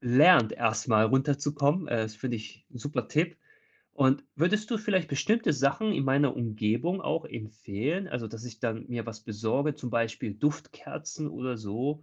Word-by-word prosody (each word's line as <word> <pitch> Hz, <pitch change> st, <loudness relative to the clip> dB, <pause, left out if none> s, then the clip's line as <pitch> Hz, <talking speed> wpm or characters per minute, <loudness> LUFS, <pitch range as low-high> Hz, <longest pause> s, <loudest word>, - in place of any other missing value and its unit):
lernt, 125 Hz, 0 st, +6 dB
erstmal 110 Hz, -1 st, +2 dB
runterzukommen. 145 Hz, +5 st, +1 dB
Äh, 120 Hz, -, +1 dB
das 110 Hz, 0 st, -5 dB
finde 120 Hz, 0 st, -2 dB
ich 105 Hz, -1 st, -11 dB
'n 125 Hz, -, -8 dB
super 145 Hz, +5 st, -3 dB
Tipp. 170 Hz, +3 st, +1 dB, 0.6 s
Und 135 Hz, 0 st, +3 dB
würdest 210 Hz, -, +1 dB
du 225 Hz, -, +1 dB
vielleicht 190 Hz, -6 st, +1 dB
bestimmte 210 Hz, +6 st, +2 dB
Sachen 145 Hz, +11 st, +1 dB
in 140 Hz, -, 0 dB
meiner 135 Hz, 0 st, +3 dB
Umgebung 115 Hz, -, 0 dB
auch 165 Hz, +1 st, -1 dB
empfehlen, 110 Hz, -, -4 dB
also, 115 Hz, -3 st, -4 dB
dass 115 Hz, +2 st, -9 dB
ich 115 Hz, -2 st, -10 dB
dann 115 Hz, 0 st, -2 dB
mir 120 Hz, -2 st, -3 dB
was 110 Hz, -1 st, -7 dB
besorge, 115 Hz, +7 st, -1 dB
zum 125 Hz, -5 st, -6 dB
Beispiel 115 Hz, -3 st, -1 dB
Duftkerzen 150 Hz, +3 st, -3 dB
oder 125 Hz, -3 st, -4 dB
so? 125 Hz, +9 st, -3 dB
135 Hz, 165 wpm, -29 LUFS, 115-155 Hz, 0.6 s, lernt